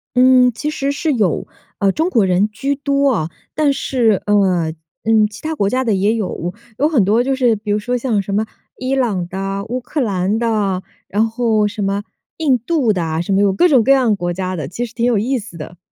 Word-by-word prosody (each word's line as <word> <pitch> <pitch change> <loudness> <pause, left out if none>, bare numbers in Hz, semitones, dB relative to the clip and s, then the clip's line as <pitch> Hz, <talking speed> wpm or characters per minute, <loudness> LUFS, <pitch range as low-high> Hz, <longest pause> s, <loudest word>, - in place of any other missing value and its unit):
嗯， 250 0 +5
其 295 +7 -3
实 280 -2 -2
是 305 +2 -1
有， 210 - 0 0.3
呃， 200 -1 +3
中 320 - 0
国 225 - +3
人 190 +3 +2
居 275 +6 -2
多 280 0 +1
哦。 160 -7 -1 0.2
但 300 -2 +2
是， 230 -8 +1
呃， 185 -6 +2 0.3
嗯， 220 -1 +4
其 210 - -12
他 315 +1 -3
国 200 -8 +1
家 255 +4 0
的 225 -4 +1
也 200 +3 +2
有， 185 -5 -3 0.3
有 295 +3 +3
很 255 - +3
多 220 +5 +3
就 270 +1 0
是 245 -4 +2
比 210 0 -5
如 205 - +2
说 245 +4 -1
像 230 -4 0
什 195 0 -5
么 215 +2 +1 0.3
伊 255 +1 -1
朗 210 -10 0
的、 195 +2 -4
乌 250 +3 -3
克 280 +4 -3
兰 200 -1 0
的， 210 -5 0 0.3
然 215 +3 +1
后 225 -2 +1
什 210 0 -5
么 200 +1 -1 0.3
印 285 -6 +2
度 250 -1 +1
的， 165 -3 -1
什 175 - -4
么 195 - +3
有 200 -1 +3
各 275 - +4
种 265 -8 +4
各 270 - +3
样 255 -6 +4
国 175 -2 -3
家 185 +1 -3
的， 155 -6 -4
其 230 - -4
实 230 - -12
挺 235 0 -1
有 245 -3 +2
意 255 +6 0
思 205 -6 -9
的。 165 +2 -9
220 Hz, 245 characters per minute, -18 LUFS, 195-255 Hz, 0.3 s, 嗯